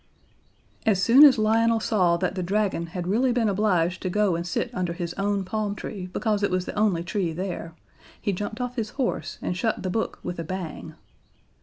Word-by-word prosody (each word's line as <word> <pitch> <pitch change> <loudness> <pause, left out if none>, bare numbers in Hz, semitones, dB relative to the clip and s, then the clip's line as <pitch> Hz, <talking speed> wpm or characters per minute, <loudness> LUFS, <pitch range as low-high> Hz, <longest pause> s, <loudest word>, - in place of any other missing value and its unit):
As 205 -4 +2
soon 235 +9 +7
as 275 -4 +8
Lionel 225 +1 +3
saw 185 -6 +2
that 180 +1 -1
the 190 - -3
Dragon 190 -2 0
had 175 +1 -5
really 235 +8 +2
been 240 -2 +1
obliged 185 -4 +1
to 185 - -2
go 205 -1 +2
and 170 +1 -3
sit 240 +7 -2
under 180 -5 -2
his 170 0 -4
own 200 0 -1
palm 210 +1 -2
tree 190 -3 -6
because 210 -1 0
it 200 - +2
was 185 0 -1
the - - -5
only 205 -5 +1
tree 175 -2 -2
there, 170 -2 -5 0.4
he 200 - -1
jumped 210 +4 -4
off 250 +1 -4
his 220 -2 -1
horse 260 -3 -2
and 180 - -1
shut 220 +5 -1
the 185 - -2
book 220 - -2
with 175 - -5
a - - -2
bang. 175 -1 -6
195 Hz, 205 wpm, -25 LUFS, 180-220 Hz, 0.4 s, as